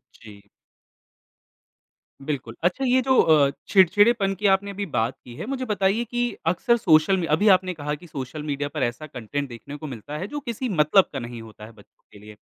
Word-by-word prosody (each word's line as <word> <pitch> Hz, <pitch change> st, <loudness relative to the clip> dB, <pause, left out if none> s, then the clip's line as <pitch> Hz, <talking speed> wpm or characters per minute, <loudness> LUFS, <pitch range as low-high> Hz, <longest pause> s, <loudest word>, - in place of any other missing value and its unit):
जी। 100 Hz, -2 st, -15 dB, 1.8 s
बिल्कुल। 130 Hz, -6 st, -4 dB
अच्छा, 180 Hz, +10 st, +1 dB
ये 255 Hz, +1 st, +3 dB
जो 260 Hz, 0 st, +2 dB
अ, 150 Hz, -3 st, +4 dB, 0.2 s
चिड़चिड़ेपन 200 Hz, +2 st, +4 dB
की 205 Hz, +3 st, -6 dB
आपने 200 Hz, +1 st, -1 dB
अभी 200 Hz, +1 st, -4 dB
बात 120 Hz, -, -1 dB
की 120 Hz, -1 st, -12 dB
है, -, -, -6 dB
मुझे 260 Hz, +1 st, -3 dB
बताइए 205 Hz, 0 st, +1 dB
कि 240 Hz, +1 st, -1 dB, 0.2 s
अक्सर 235 Hz, +8 st, +2 dB
सोशल 170 Hz, -2 st, +4 dB
मी 180 Hz, -, -1 dB
अभी 205 Hz, +7 st, +1 dB
आपने 185 Hz, 0 st, -3 dB
कहा 150 Hz, -2 st, -4 dB
कि 175 Hz, +4 st, -15 dB
सोशल 145 Hz, 0 st, -6 dB
मीडिया 145 Hz, -1 st, -3 dB
पर 150 Hz, -2 st, -3 dB
ऐसा 125 Hz, +6 st, -3 dB
कंटेंट 140 Hz, +2 st, -5 dB
देखने 120 Hz, +4 st, -9 dB
को 155 Hz, -, -8 dB
मिलता 135 Hz, +3 st, -7 dB
है, 185 Hz, +5 st, -4 dB
जो 295 Hz, +4 st, -5 dB
किसी 250 Hz, -2 st, -4 dB
मतलब 175 Hz, +1 st, +3 dB
का 135 Hz, -, -3 dB
नहीं 120 Hz, -1 st, -7 dB
होता 110 Hz, -1 st, -12 dB
है 110 Hz, -, -13 dB
बच्चों 105 Hz, -2 st, -22 dB
के 105 Hz, -, -15 dB
लिए। 105 Hz, +1 st, -13 dB
155 Hz, 200 wpm, -24 LUFS, 130-205 Hz, 1.8 s, अ